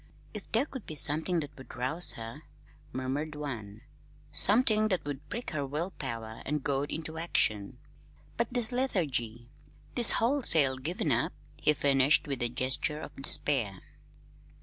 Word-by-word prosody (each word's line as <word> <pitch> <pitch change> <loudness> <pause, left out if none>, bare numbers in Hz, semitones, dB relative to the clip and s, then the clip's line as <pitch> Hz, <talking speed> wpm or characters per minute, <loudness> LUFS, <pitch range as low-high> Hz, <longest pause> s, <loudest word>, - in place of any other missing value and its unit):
"If 210 -3 -9
there 230 +5 +3
could 265 -6 -9
be 155 - -6
something 160 +4 +2
that 145 -1 -8
would 130 - -11
rouse 130 +8 +1
her," 115 +6 -8 0.5
murmured 135 +4 -3
one; 110 -9 -6 0.5
"something 215 0 +4
that 185 -7 -1
would 145 0 -6
prick 240 - -5
her 150 -3 -2
will 150 +7 -2
power 115 -4 -6
and 150 0 -2
goad 140 +1 -1
it - - -1
into 160 0 -5
action! 110 -11 0 0.6
But 235 - 0
this 240 -2 +3
lethargy 135 - -2 0.4
this 240 -2 +5
wholesale 170 - +4
giving 155 +3 -2
up!" 120 +1 0 0.2
he - - +3
finished 140 +2 +4
with 135 -3 -3
a 120 - +1
gesture 130 +5 0
of - - -9
despair. 130 -7 +1
145 Hz, 150 wpm, -30 LUFS, 130-175 Hz, 0.6 s, this